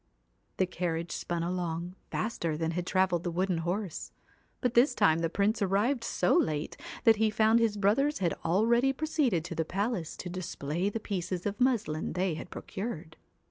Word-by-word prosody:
The 190 Hz, -, +3 dB
carriage 170 Hz, -2 st, -3 dB
spun 170 Hz, -1 st, -2 dB
along, 175 Hz, 0 st, -2 dB, 0.2 s
faster 170 Hz, -8 st, -2 dB
than 165 Hz, 0 st, -1 dB
had 175 Hz, +1 st, -3 dB
travelled 185 Hz, -3 st, +2 dB
the 175 Hz, -, -1 dB
wooden 180 Hz, 0 st, 0 dB
horse; 180 Hz, +2 st, -3 dB, 0.5 s
but 250 Hz, -2 st, 0 dB
this 245 Hz, +5 st, +5 dB
time 160 Hz, 0 st, +4 dB
the 165 Hz, 0 st, 0 dB
Prince 205 Hz, +5 st, +1 dB
arrived 210 Hz, +6 st, +1 dB
so 180 Hz, -5 st, +1 dB
late 150 Hz, -1 st, 0 dB, 0.3 s
that 225 Hz, -1 st, +6 dB
he 220 Hz, 0 st, +3 dB
found 220 Hz, +2 st, +4 dB
his 225 Hz, -3 st, +1 dB
brothers 230 Hz, +9 st, +2 dB
had 175 Hz, -3 st, 0 dB
already 235 Hz, +9 st, +3 dB
proceeded 270 Hz, -, 0 dB
to 180 Hz, -, -5 dB
the 165 Hz, -, 0 dB
palace 195 Hz, 0 st, -2 dB
to -, -, -6 dB
display 175 Hz, 0 st, -2 dB
the 225 Hz, -, -3 dB
pieces 185 Hz, -3 st, -3 dB
of 205 Hz, +3 st, -3 dB
muslin 230 Hz, -12 st, +1 dB
they 180 Hz, -1 st, 0 dB
had 160 Hz, -, -7 dB
procured. 170 Hz, -7 st, -6 dB
185 Hz, 175 wpm, -30 LUFS, 170-220 Hz, 0.5 s, that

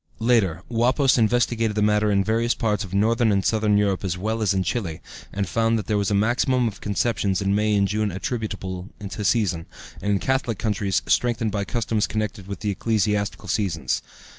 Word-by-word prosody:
Later, 110 Hz, -8 st, +2 dB
Wappäus 125 Hz, +3 st, +2 dB
investigated 115 Hz, -1 st, +1 dB
the 105 Hz, -, +1 dB
matter 105 Hz, 0 st, +3 dB
in 100 Hz, -1 st, +2 dB
various 115 Hz, +3 st, +1 dB
parts 105 Hz, -2 st, 0 dB
of 95 Hz, -, -9 dB
northern 110 Hz, +3 st, +2 dB
and 100 Hz, -1 st, +1 dB
southern 105 Hz, -2 st, +2 dB
Europe 100 Hz, -2 st, +1 dB
as 90 Hz, -2 st, -2 dB
well 110 Hz, +4 st, -2 dB
as 105 Hz, -, +2 dB
in 95 Hz, -1 st, +1 dB
Chile, 90 Hz, -4 st, -3 dB, 0.3 s
and 100 Hz, -1 st, -2 dB
found 115 Hz, +4 st, +1 dB
that 105 Hz, -, -4 dB
there 105 Hz, -, 0 dB
was 100 Hz, -1 st, +1 dB
a 100 Hz, -, +1 dB
maximum 120 Hz, +4 st, +2 dB
of 100 Hz, -3 st, -6 dB
conceptions 100 Hz, -2 st, 0 dB
in 100 Hz, 0 st, 0 dB
May 105 Hz, +1 st, +2 dB
and 100 Hz, -1 st, +3 dB
June 105 Hz, 0 st, -1 dB
attributable 95 Hz, -2 st, -4 dB, 0.2 s
to 105 Hz, +2 st, -5 dB
season, 95 Hz, -6 st, +1 dB, 0.3 s
and 100 Hz, +1 st, 0 dB
in -, -, +3 dB
Catholic 130 Hz, -3 st, 0 dB
countries 100 Hz, -3 st, 0 dB
strengthened 115 Hz, -3 st, +1 dB
by 100 Hz, -1 st, -2 dB
customs 115 Hz, -2 st, -1 dB
connected 105 Hz, -3 st, -3 dB
with 100 Hz, 0 st, -7 dB
ecclesiastical 105 Hz, 0 st, -1 dB
seasons. 100 Hz, -5 st, -1 dB
105 Hz, 190 wpm, -23 LUFS, 100-115 Hz, 0.3 s, matter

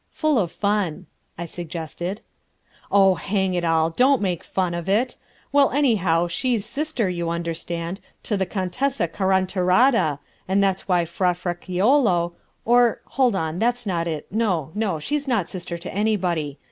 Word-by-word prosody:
"Full 310 Hz, -5 st, +2 dB
of 175 Hz, -5 st, -1 dB
fun," 200 Hz, -6 st, -1 dB, 0.3 s
I 170 Hz, -, -4 dB
suggested. 170 Hz, +3 st, -5 dB, 0.7 s
"Oh, 195 Hz, -1 st, +6 dB
hang 190 Hz, 0 st, -1 dB
it 175 Hz, -1 st, -1 dB
all, 165 Hz, -1 st, +2 dB
don't 255 Hz, +8 st, +4 dB
make 180 Hz, -5 st, -2 dB
fun 185 Hz, -2 st, -1 dB
of 170 Hz, +1 st, -4 dB
it! 225 Hz, +6 st, +1 dB, 0.4 s
Well, 285 Hz, -1 st, +5 dB
anyhow, 195 Hz, -, +2 dB
she's 220 Hz, +5 st, -1 dB
sister, 290 Hz, -3 st, -2 dB
you 170 Hz, -2 st, -2 dB
understand, 170 Hz, +1 st, -3 dB, 0.2 s
to 210 Hz, -, -1 dB
the 190 Hz, -2 st, -1 dB
Contessa 205 Hz, +4 st, -1 dB
Carantarata, 185 Hz, -, +2 dB, 0.3 s
and 195 Hz, +2 st, +2 dB
that's 195 Hz, -1 st, 0 dB
why 175 Hz, -3 st, +2 dB
Fra 180 Hz, +2 st, 0 dB
Fraliccolo, 180 Hz, +2 st, +1 dB, 0.3 s
or... 240 Hz, 0 st, +4 dB
hold 255 Hz, -6 st, +2 dB
on, 160 Hz, -1 st, -2 dB
that's 240 Hz, +1 st, 0 dB
not 170 Hz, -4 st, -1 dB
it, 155 Hz, -3 st, -3 dB
no, 185 Hz, -8 st, 0 dB
no, 205 Hz, -6 st, -1 dB
she's 290 Hz, -, -2 dB
not 225 Hz, -9 st, +1 dB
sister 175 Hz, -2 st, -5 dB
to 170 Hz, +2 st, -7 dB
anybody. 180 Hz, -9 st, 0 dB
185 Hz, 150 wpm, -23 LUFS, 170-220 Hz, 0.7 s, Oh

